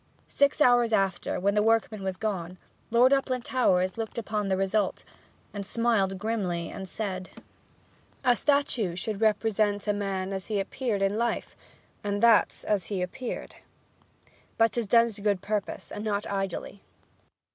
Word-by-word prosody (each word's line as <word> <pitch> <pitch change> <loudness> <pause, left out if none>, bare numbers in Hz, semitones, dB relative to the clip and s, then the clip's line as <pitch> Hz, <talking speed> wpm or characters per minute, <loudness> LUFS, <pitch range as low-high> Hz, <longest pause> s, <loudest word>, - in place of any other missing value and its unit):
Six 280 +2 +2
hours 245 -4 +5
after, 195 -4 0
when 200 +2 +1
the 210 - +3
workman 225 -1 +1
was 190 -1 -3
gone, 185 -5 -3 0.3
Lord 245 +4 +5
Uplandtowers 250 -8 +1
looked 225 +1 -4
upon 210 -2 -2
the 190 -1 +1
result, 195 +1 0 0.5
and 205 -1 -4
smiled 205 -3 +1
grimly, 190 -5 -2
and 190 -1 -7
said: 185 -3 -4 0.9
'A 250 -2 +4
statue 255 - +1
should 210 +3 -4
represent 215 -1 +1
a 210 - +3
man 195 -1 -2
as 190 -1 -5
he 210 -2 -1
appeared 205 0 -2
in 200 +3 +1
life, 235 0 -2 0.5
and 205 0 -1
that's 230 -3 +4
as 200 -4 0
he 195 -3 -2
appeared. 250 +7 -5
Ha! - - -18
ha! - - -34 0.3
But 225 0 +4
'tis 235 -3 -2
done 235 +2 +5
to 210 -2 -8
good 200 -3 0
purpose, 210 -2 -3
and 205 - -5
not 205 -1 -1
idly.' 195 0 -4
210 Hz, 155 wpm, -27 LUFS, 195-230 Hz, 0.9 s, hours